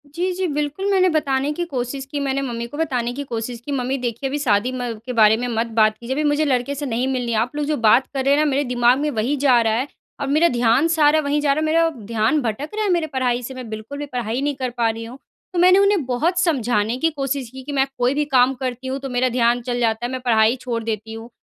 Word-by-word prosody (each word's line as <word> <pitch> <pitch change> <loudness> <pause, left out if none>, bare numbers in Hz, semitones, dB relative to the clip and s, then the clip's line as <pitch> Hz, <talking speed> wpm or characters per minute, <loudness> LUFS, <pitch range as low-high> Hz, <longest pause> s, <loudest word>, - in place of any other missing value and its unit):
जी, 360 +2 0
जी 370 0 -1
बिल्कुल 295 +5 -3
मैंने 370 -1 +4
बताने 285 -3 0
की 350 - -3
कोशिश 265 -2 -4
की। 290 - -2
मैंने 275 -1 -1
मम्मी 235 -3 -4
को 290 - -9
बताने 250 -7 -1
की 285 +3 -5
कोशिश 235 -1 -5
की, 290 - -5
मम्मी 265 0 -1
देखिए 245 +2 -3
अभी 290 - -2
शादी 235 -3 +1
म 245 -2 -3
के 250 - -4
बारे 220 -1 +5
में 245 +1 -3
मत 230 0 -1
बात 215 0 +4
कीजिए 240 +3 -4
अभी 305 - 0
मुझे 295 +1 +1
लड़के 270 0 0
से 290 +1 -4
नहीं 245 +1 -1
मिलनी 245 -2 -2
है। 220 - 0
आप 245 +6 -2
लोग 295 - -1
जो 300 0 -1
बात 230 +3 +4
कर 265 -1 -2
रहे 280 +1 +4
हैं 305 - +2
न 295 - +2
मेरे 280 +1 +1
दिमाग 245 0 +2
में 300 - 0
वही 240 +5 0
जा 260 -3 +4
रहा 220 -1 +1
है 255 +5 -1 0.3
और 280 - -3
मेरा 310 +5 +4
ध्यान 240 +5 +2
सारा 310 -2 +4
वहीं 290 0 0
जा 280 -2 +2
रहा 305 - -1
है, 310 - 0
मेरा 330 +1 +3 0.2
ध्यान 230 +7 +1
भटक 245 +6 -3
रहा 435 - -1
है 415 - 0
मेरे 340 -2 +1
पढ़ाई 250 -3 -1
से। 265 - -6
मैं 255 -3 -8
बिल्कुल 220 +6 -7
भी 290 - -3
पढ़ाई 245 -1 -3
नहीं 290 -1 -1
कर 260 -2 -3
पा 230 -1 +2
रही 225 +1 -4
हूँ। 245 +3 -10 0.4
तो 350 - 0
मैंने 365 +2 +6
उन्हें 400 -7 +3
बहुत 315 +9 0
समझाने 245 - +1
की 325 +4 +1
कोशिश 275 -4 -3
की 265 +1 -10
कि 290 - -6
मैं 270 -1 +2
कोई 245 +2 +2
भी 295 +1 +1
काम 255 +1 +4
करती 255 0 -5
हूँ, 265 +1 -2
तो 270 - -6
मेरा 250 0 +1
ध्यान 240 0 +2
चल 245 0 -3
जाता 230 0 0
है 245 - -3
मैं 260 - -3
पढ़ाई 225 -1 +3
छोड़ 235 -2 -3
देती 220 0 -4
हूँ। 225 +1 -9
260 Hz, 275 wpm, -21 LUFS, 240-290 Hz, 0.4 s, मैंने